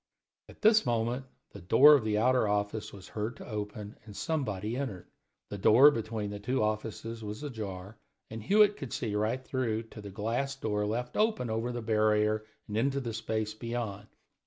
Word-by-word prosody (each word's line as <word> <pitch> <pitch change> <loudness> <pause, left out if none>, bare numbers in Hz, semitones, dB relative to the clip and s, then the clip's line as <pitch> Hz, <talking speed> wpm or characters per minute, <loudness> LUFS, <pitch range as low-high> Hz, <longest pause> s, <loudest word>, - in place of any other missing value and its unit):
At - - -16
this 220 0 +6
moment 120 +1 -1 0.3
the 100 - -10
door 130 - +7
of 140 -6 +4
the 105 -1 0
outer 125 0 +3
office 105 +1 -1
was 95 -2 -12
heard 110 +3 -3
to - - -10
open 105 -1 -6
and 105 -2 -12
somebody 115 - -2
entered. 120 -10 -4 0.4
The 100 - -6
door 130 +9 +7
between 110 -4 -3
the 105 - -6
two 125 +3 0
offices 110 +1 -3
was 105 +6 -6
ajar, 105 -6 -6 0.3
and 110 0 -7
Hewitt 205 - +4
could 135 -5 -6
see 110 -4 -2
right 110 +5 -1
through 115 -4 -1
to 110 - -10
the 100 - -8
glass 115 +8 -2
door 105 -5 -1
left 120 +3 -3
open 215 - +1
over 115 +2 -1
the 120 -1 -5
barrier 110 -1 +2 0.2
and 105 - -3
into 135 +4 +1
the 120 -4 -4
space 110 -1 -2
beyond. 110 -2 -5
110 Hz, 180 wpm, -30 LUFS, 105-125 Hz, 0.4 s, door